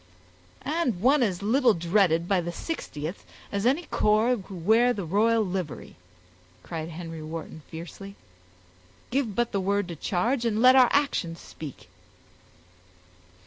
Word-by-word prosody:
"And 285 - 0
one 265 +7 +4
as 200 -5 0
little 240 +2 +3
dreaded 170 -1 +2
by 190 -2 +2
the 175 - -4
60th, 170 - -5 0.3
as 200 +3 0
any 285 +7 +2
corps 220 -2 +2
who 195 -1 -10
wear 225 +8 +3
the 200 -6 -4
royal 220 +5 +2
livery," 180 -5 -5 0.7
cried 160 -1 -5
Henry 165 -1 -7
Wharton, 160 0 -7
fiercely. 180 +4 -9 1.0
"Give 245 -6 0
but 240 0 0
the 200 - 0
word 200 0 0
to 170 - -5
charge, 230 - 0
and 220 -2 0
let 255 +2 +7
our 255 -2 +7
actions 195 - 0
speak." 150 -5 -10
200 Hz, 140 wpm, -26 LUFS, 170-240 Hz, 1.0 s, let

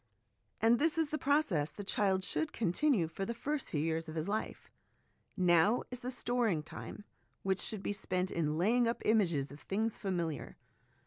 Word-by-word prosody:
And 230 +2 +4
this 320 +1 +2
is 320 -2 +2
the 310 - -2
process 265 - +2
the 205 - -7
child 195 -1 +1
should 315 +9 -1
continue 220 - +2
for 180 +4 -5
the 235 +4 -3
first 290 +5 -2
few 150 - -1
years 160 0 -1
of 155 - -7
his 160 +2 -2
life. 215 +2 -3 0.7
Now 180 +5 +4
is 250 - -4
the 250 - -4
storing 240 -9 +1
time 180 - -8 0.4
which 190 -1 +1
should 215 -4 -3
be - - -1
spent 185 -2 -2
in 155 -2 0
laying 230 +7 +3
up 230 - -2
images 170 -11 +2
of 145 - -10
things 215 +6 -2
familiar. 170 - -3
200 Hz, 180 wpm, -33 LUFS, 165-240 Hz, 0.7 s, And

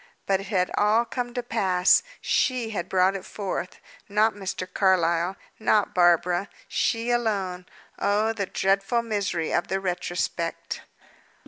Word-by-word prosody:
But 195 -1 +2
it 195 - -8
had 185 -3 0
all 215 +3 +3
come 245 0 -4
to 245 - -2
pass. 190 -6 +3 0.2
She 245 -4 +1
had 175 -5 -4
brought 185 +1 +3
it 190 - -5
forth. 190 -3 -5 0.3
Not 215 +2 +3
Mr. 190 -2 -4
Carlyle; 180 -2 +2 0.2
not 215 -1 +2
Barbara; 175 +1 +3 0.2
she 230 +1 0
alone. 195 -6 -1 0.3
Oh, 210 +2 +2
the 200 -4 -3
dreadful 195 +6 +1
misery 200 -7 -2
of 175 - +1
the 190 - -1
retrospect! 175 -2 -3
195 Hz, 135 wpm, -25 LUFS, 180-220 Hz, 0.3 s, all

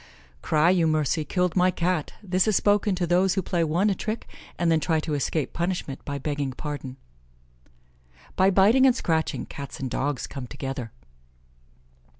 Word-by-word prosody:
"Cry 155 - +3
you 175 -3 +3
mercy, 155 0 +1
killed 180 +2 0
my 185 0 +4
Cat." 175 -3 -1
This 185 +1 +1
is 215 - +2
spoken 205 0 +2
to 180 -1 -1
those 180 +2 +2
who 190 - 0
play 170 -1 0
one 170 +6 +1
a 205 - +3
trick, 215 +4 -4 0.3
and 170 -1 +2
then 160 - +4
try 160 0 +1
to 155 0 -3
escape 145 +1 -1
punishment 170 -5 -3
by 140 -1 -3
begging 140 -1 -3
pardon. 140 -2 -6 1.4
"By 190 +1 +4
biting 215 +8 +5
and 255 - +4
scratching, 160 -8 -1
Cats 140 -1 -8
and 130 -2 -4
Dogs 140 -2 -1
come 130 -3 -7
together." 135 -3 -5
165 Hz, 165 wpm, -25 LUFS, 145-185 Hz, 1.4 s, biting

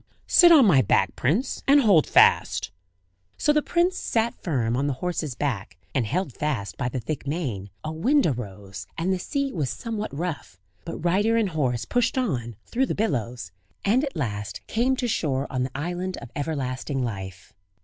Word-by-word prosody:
"Sit 345 -2 +7
on 295 -7 +8
my 150 -10 +6
back, 100 - +2
prince, 200 - 0
and 285 +1 +6
hold 195 - +5
fast." - - +4 0.7
So 295 - +3
the 300 - +3
prince 350 +4 +1
sat 230 0 0
firm 120 -9 0
on 140 +3 0
the 145 - 0
horse's 155 -3 -3
back, 105 -9 -3 0.2
and 130 -6 0
held 160 - -1
fast 135 -10 -2
by 125 - -2
the 130 - -3
thick 145 +3 -5
mane; 130 - -3
a 155 - -3
wind 255 - +2
arose, 100 - -4
and 180 +3 0
the 185 - -2
sea 280 +7 -2
was 150 -7 -1
somewhat 220 -2 -4
rough; 145 - -5 0.3
but 165 - -5
rider 205 +6 +3
and 220 -4 +2
horse 130 -8 -1
pushed 245 +1 0
on, 125 - -1
through 260 +2 0
the - - -2
billows, 120 - -2 0.3
and 235 +7 +3
at 275 - -4
last 105 - -4
came 250 +4 +1
to 250 -1 -2
shore 140 - 0
on 130 - -1
the 130 +1 -3
island 180 +4 -3
of 120 - -10
Everlasting 135 -2 -2
Life. 95 -5 -6
150 Hz, 180 wpm, -25 LUFS, -, 0.7 s, on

